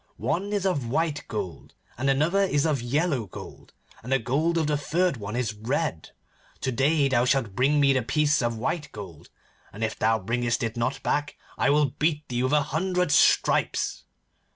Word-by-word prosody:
One 170 - -2
is 205 -2 -1
of 145 -11 0
white 155 +2 -1
gold, 95 -6 -6 0.2
and 135 +2 -1
another 155 +8 +2
is 145 -7 +1
of 150 -6 +1
yellow 140 - 0
gold, - - -11 0.3
and 125 - -8
the 135 - +5
gold 150 +8 0
of 160 - +1
the 150 0 +1
third 160 +2 0
one 105 0 -6
is 120 -3 -1
red. 115 - -2 0.5
To 130 - -1
day 140 +4 +2
thou 125 -3 +2
shalt 125 -6 +1
bring 140 +7 +2
me 140 -1 +4
the 130 - +1
piece 150 +4 +1
of 120 -1 -1
white 145 +7 -3
gold, 95 -7 -10 0.4
and 110 +3 -6
if 110 - -2
thou 110 +1 +3
bringest 120 +4 -1
it 115 0 -2
not 130 +3 -2
back, 145 0 -1 0.2
I - - +1
will 145 -2 +3
beat 150 -1 0
thee 120 -1 -1
with 130 +3 0
a 150 -1 +4
hundred 180 +2 -1
stripes. 145 - +2
135 Hz, 190 wpm, -26 LUFS, 120-150 Hz, 0.5 s, the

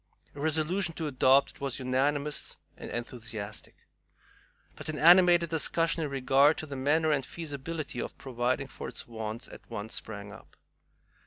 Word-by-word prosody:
A 145 - -11
resolution 160 +4 0
to 160 - -3
adopt 135 -1 +4
it - - -21
was 140 -3 -2
unanimous 140 +3 -1 0.2
and - - -8
enthusiastic. 110 -3 -6 1.0
But - - -7
an 155 - -3
animated 175 0 +6
discussion 165 +1 +2
in 150 - -2
regard 135 +2 +4
to - - -4
the 140 -2 -7
manner 155 +4 +2
and 140 -3 +1
feasibility 150 -2 -5
of - - -6
providing 130 +1 -1
for 130 - -8
its - - -7
wants 110 0 -5
at - - -13
once 110 -1 -5
sprang 105 -2 -5
up. 95 - -15
140 Hz, 155 wpm, -29 LUFS, 120-155 Hz, 1.0 s, animated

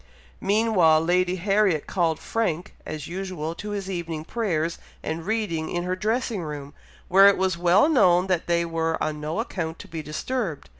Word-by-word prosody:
Meantime, 190 -7 +3
Lady 180 +1 +2
Harriet 195 -3 +2
called 170 -4 0
Frank, 180 -7 -2
as 155 -2 -5
usual, 180 -3 -4
to 210 +5 -7
his 200 -2 -4
evening 170 -4 -4
prayers 170 -8 -1 0.2
and 160 +2 -4
reading 210 -8 -1
in 175 0 -2
her 180 +1 -1
dressing 220 +1 -1
room, 145 -3 -6 0.3
where 195 +2 +7
it 200 - +5
was 190 -1 +1
well 175 - +4
known 180 - +4
that 185 -3 -1
they 170 0 +2
were 165 -1 -1
on 150 -1 -2
no 155 +7 -3
account 170 -8 -3
to - - -11
be 160 -1 -5
disturbed. 165 - -4
175 Hz, 170 wpm, -25 LUFS, 160-200 Hz, 0.3 s, where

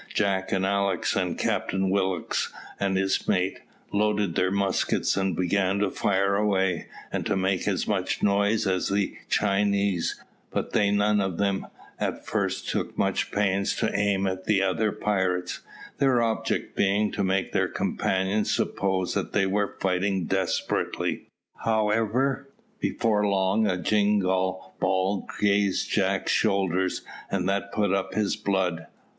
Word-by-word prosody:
Jack 95 -2 0
and 95 0 +1
Alick, 100 -2 0
and - - -1
Captain 95 -1 0
Willock 95 -3 0 0.4
and 95 -1 +1
his 95 0 0
mate, 95 +1 +1 0.3
loaded 105 -3 +1
their 90 +3 +2
muskets 100 0 +1
and 95 -1 0
began 95 +1 +1
to 100 -2 +1
fire 100 0 +1
away, 95 -4 +1 0.3
and - - -1
to 105 - +1
make 95 -1 0
as - - 0
much - - -1
noise 100 +2 +2
as 95 -2 0
the 100 0 0
Chinese, 100 -2 +1 0.3
but - - -3
they 100 - +3
none 105 0 +2
of 95 -3 -2
them 100 -1 0 0.3
at - - -3
first - - -2
took - - -2
much - - 0
pains 100 -1 +1
to 110 - -1
aim 100 -1 +1
at 95 -1 -3
the 105 -2 +3
other 100 +3 +1
pirates, 95 -4 -1 0.4
their 135 -3 +4
object 115 -1 -1
being 100 +2 +2
to 100 - -1
make 95 0 0
their - - +1
companions 95 +3 0
suppose 95 -2 0
that - - -2
they 100 -2 +3
were 100 +1 -1
fighting 95 0 0
desperately. 95 -1 -1 0.3
However, 115 - +1 0.3
before 105 -3 +1
long 100 +2 +2
a 90 -2 0
jingall 95 -2 +1
ball 95 +1 0
grazed 100 -1 +1
Jack's - - +1
shoulder, 95 -1 +2 0.4
and 95 -2 -1
that 100 0 -1
put 100 -3 +1
up 95 -1 -1
his 105 -2 +1
blood. 90 -5 -1
100 Hz, 145 wpm, -26 LUFS, 95-105 Hz, 0.4 s, their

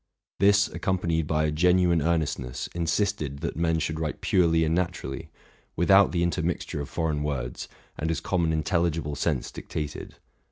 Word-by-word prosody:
This, 100 +2 +5
accompanied 85 -6 -1
by 80 0 +1
a 75 - 0
genuine 90 +1 +3
earnestness, 75 -6 -1
insisted 85 -4 -1
that - - -3
men 80 0 +1
should 80 0 -2
write 80 -2 -3
purely 80 -2 +3
and 80 - 0
naturally, 85 -6 -3 0.5
without 95 +3 +5
the 85 -1 +1
inter 85 -3 0
mixture 80 -3 -2
of 70 - -6
foreign 80 -3 -1
words, 65 -5 -3 0.3
and 80 - -1
as 80 - 0
common 85 -3 0
intelligible 80 -1 0
sense 75 -2 -1
dictated. 75 -1 -6
80 Hz, 155 wpm, -26 LUFS, 75-85 Hz, 0.5 s, This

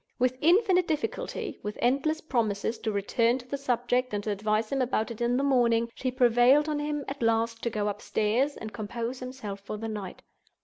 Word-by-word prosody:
With 255 +1 +1
infinite 365 +2 +4
difficulty, 320 +10 -3
with 210 0 -5
endless 280 +6 +1
promises 225 -5 -1
to 220 - -2
return 230 +4 +1
to 250 -1 -12
the 280 - -3
subject, 250 -3 0
and 205 - -2
to 215 - -1
advise 215 +2 0
him 275 -1 +1
about 235 -2 0
it 230 - -8
in 240 +1 +2
the 275 - +1
morning, 235 -4 +3
she 255 - -2
prevailed 250 +3 +4
on 300 -1 -1
him, 295 -1 -2
at 275 -1 -6
last, 230 0 +1
to 235 - 0
go 210 -2 -1
upstairs 215 +6 0
and 220 -1 -7
compose 235 +3 -4
himself 250 -6 -6
for 200 +2 -6
the 225 +1 -5
night. 210 -4 -6
240 Hz, 195 wpm, -28 LUFS, 220-270 Hz, -, infinite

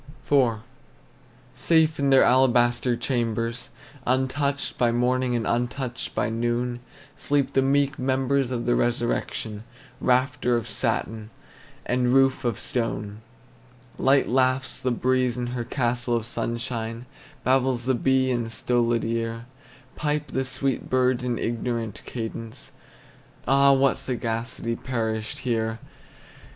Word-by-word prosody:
IV. 125 -6 +2 0.9
Safe 160 -2 +2
in 140 -1 +2
their 135 -1 +6
alabaster 120 -1 +3
chambers, 115 -2 -2 0.4
Untouched 135 +2 0
by 120 -1 +3
morning 125 +1 +1
and 115 -2 -1
untouched 125 +1 -2
by - - +1
noon, 120 +2 -1 0.4
Sleep 145 -2 0
the 135 - +4
meek 140 +1 +1
members 130 0 +1
of 120 -2 -3
the 120 - +2
resurrection, 120 -3 -1 0.4
Rafter 125 -1 +2
of 115 - -4
satin, 110 -1 -2 0.6
and 125 0 +1
roof 135 0 +3
of 120 -4 -1
stone. 110 -3 -3 0.8
Light 135 +1 +4
laughs 130 +1 +1
the 130 - -1
breeze 125 0 +1
in 125 - -2
her 120 -1 -2
castle 120 -1 -1
of 115 -2 -1
sunshine; 115 0 -4 0.4
Babbles 130 -2 +2
the 130 - +2
bee 130 +1 +2
in 120 -2 -1
a - - -7
stolid 120 0 +1
ear; 115 0 -2 0.5
Pipe 150 0 -2
the 130 0 -1
sweet 135 0 -1
birds 130 -1 +2
in 120 -2 -1
ignorant 115 -2 -3
cadence, 115 -1 -6 0.8
Ah, 140 +1 +5
what 135 0 +3
sagacity 115 -1 -2
perished 110 -3 -3
here! 115 -2 0
125 Hz, 125 wpm, -25 LUFS, 115-130 Hz, 0.9 s, their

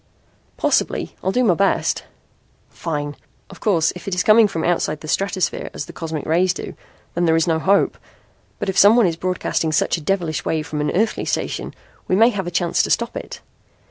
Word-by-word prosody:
"Possibly. - - 0
I'll 190 - +1
do 250 +5 +1
my 205 -7 +4
best." 195 +4 +1 0.6
"Fine! 145 -3 -4 0.4
Of - - -12
course, 170 -7 +2
if 180 - -10
it 195 - -1
is 180 - +1
coming 215 0 +6
from 165 -5 -4
outside 160 -3 0
the 155 - -8
stratosphere 190 +2 -1
as - - -4
the - - -11
cosmic 160 -3 -5
rays 175 +3 +2
do, - - -6 0.4
there 170 -2 +2
is 165 - +2
no 160 -2 +1
hope. 195 +4 +2 0.6
But - - -4
if 190 - +1
someone 220 +3 +7
is 170 -2 0
broadcasting 175 -2 -1
such 155 - +1
a - - -8
devilish 170 -1 -1
wave 155 -1 -1
from 150 -1 -3
an 150 - 0
earthly 215 +4 0
station - - -3 0.3
we 185 - +2
may 225 +4 +6
have 195 -6 -3
a - - -1
chance 170 0 +1
to - - -2
stop 235 0 0
it. - - -7
175 Hz, 200 wpm, -20 LUFS, 160-195 Hz, 0.6 s, someone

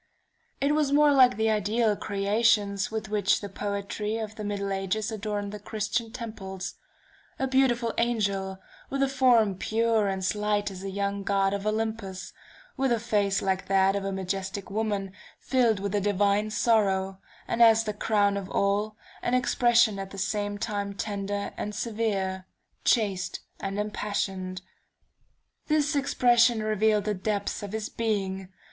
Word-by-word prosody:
It 280 +2 +2
was 300 -2 +1
more 295 0 +5
like 255 -5 +5
the 220 0 +2
ideal 215 +1 +1
creations 200 0 +1
with 220 -2 -4
which 205 -2 +2
the 205 - -7
poetry 205 +2 -3
of 220 -1 -5
the 215 - -7
middle 200 -1 -2
ages 195 +3 -2
adorned 205 -1 -3
the 210 - -7
Christian 220 +2 -2
temples: 205 -6 -6 0.6
a 265 - 0
beautiful 250 -3 +2
angel, 200 -5 0 0.3
with 275 0 0
a - - +3
form 250 -6 +4
pure 225 -1 +1
and 190 -1 -2
slight 210 0 0
as 185 -1 -8
a 195 - -4
young 200 +1 -2
god 195 0 +1
of 200 +1 -3
Olympus, 215 -3 -3 0.4
with 270 -2 0
a 235 - +2
face 205 -4 +1
like 190 0 -1
that 195 0 +3
of 200 - -2
a 195 - -2
majestic 195 +1 -4
woman 205 -2 -1 0.3
filled 240 -6 +2
with 200 0 -3
a 205 - +1
divine 205 +1 +2
sorrow, 195 -4 +1 0.3
and 230 - -1
as 225 -1 +7
the 210 -1 -3
crown 205 -1 +1
of 195 -1 -5
all, 205 +2 0 0.3
an 245 - +1
expression 240 -4 +3
at 195 0 -5
the 195 - -10
same 205 +1 -2
time 200 -2 -3
tender 200 0 -3
and 210 0 -4
severe, 205 -4 -2 0.4
chaste 200 -6 +1 0.2
and 195 0 -4
impassioned. 195 -3 -3 1.0
"This 300 -1 +2
expression 240 -4 +3
revealed 215 -1 +2
the 210 - 0
depths 205 +1 -2
of 205 -1 -6
his 220 0 -3
being. 195 -4 -2
210 Hz, 155 wpm, -27 LUFS, 195-225 Hz, 1.0 s, as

